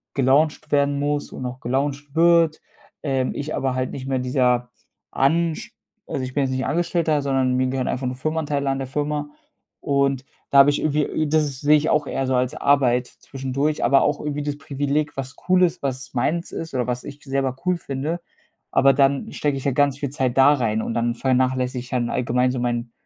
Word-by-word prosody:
gelauncht 140 +3 +2
werden 140 0 +2
muss 145 0 -1
und 130 - -6
auch 125 +1 -5
gelauncht 140 +3 -2
wird. 165 -1 +4 0.4
Ähm, 135 -3 0
ich 150 +2 -4
aber 130 -1 -1
halt 130 0 -2
nicht 130 0 -6
mehr 135 -1 0
dieser 125 -1 +1 0.4
Ansch 160 +4 0 0.3
also - - -3
ich 130 0 -6
bin 145 - +2
jetzt 130 - -1
nicht 130 0 -1
Angestellter, 165 -2 0
sondern 135 -2 +1
mir 130 0 +2
gehören 130 0 -2
einfach 130 - -2
nur 125 0 -2
Firmenanteile 145 0 -1
an 135 - 0
der 135 - -3
Firma 145 +2 -2 0.5
und 140 -1 +1 0.3
da 140 - +6
habe 140 +1 +8
ich 145 - +1
irgendwie 150 0 +1
äh, 155 +2 -1
das 145 -3 0
sehe 150 +1 +5
ich 155 +2 -1
auch 150 -2 +2
eher 135 -1 -2
so 130 - +1
als 125 0 +1
Arbeit 125 -3 +2
zwischendurch, 140 +3 -3
aber 135 +3 +5
auch 145 0 +1
irgendwie 150 -1 -3
das 145 0 -3
Privileg, 145 +1 -2
was 135 0 -5
cool 185 0 +5
ist, 175 0 +1
was 135 0 -4
meins 155 +7 -1
ist 165 -1 -6
oder 125 -1 0
was 125 0 -2
ich 145 0 -10
selber 135 -2 -1
cool 180 -1 +2
finde. 155 +3 -4 0.5
Aber 135 0 +5
dann 135 0 +2
stecke 145 -2 -1
ich 135 - -7
ja 140 - +2
ganz 140 +1 +2
viel 140 - -2
Zeit 130 -4 -1
da 135 +2 +7
rein 110 -5 0
und - - -3
dann 120 0 0
vernachlässige 130 0 0
ich 125 0 -10
halt 120 -2 +1
allgemein 125 0 +1
so 125 - -3
mein 120 -1 -2
135 Hz, 210 wpm, -22 LUFS, 130-145 Hz, 0.5 s, habe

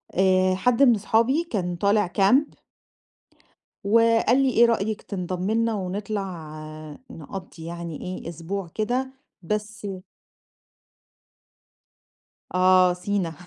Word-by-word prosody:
آآ 185 0 +3
حد 240 +7 +2
من 245 -4 +6
اصحابي، 230 - +1
كان 180 -5 -2
طالع 200 +2 +2
camp 260 +10 +3 1.2
وقال 230 +3 +4
لي 265 - +3
"إيه 235 -1 +5
رأيِك 220 -2 0
تنضَمي 185 +1 -3
لينا 230 0 +1
ونطلع 190 -4 -4 0.6
نقضّي 165 +1 -9
يعني 170 -2 -6
إيه 185 -2 -6
أسبوع 170 +3 -5
كده" 245 +8 -2 0.3
بس 210 +3 -4 2.7
آه، 185 0 +5
سينا 180 -2 -2
200 Hz, 100 wpm, -24 LUFS, 180-225 Hz, 2.7 s, من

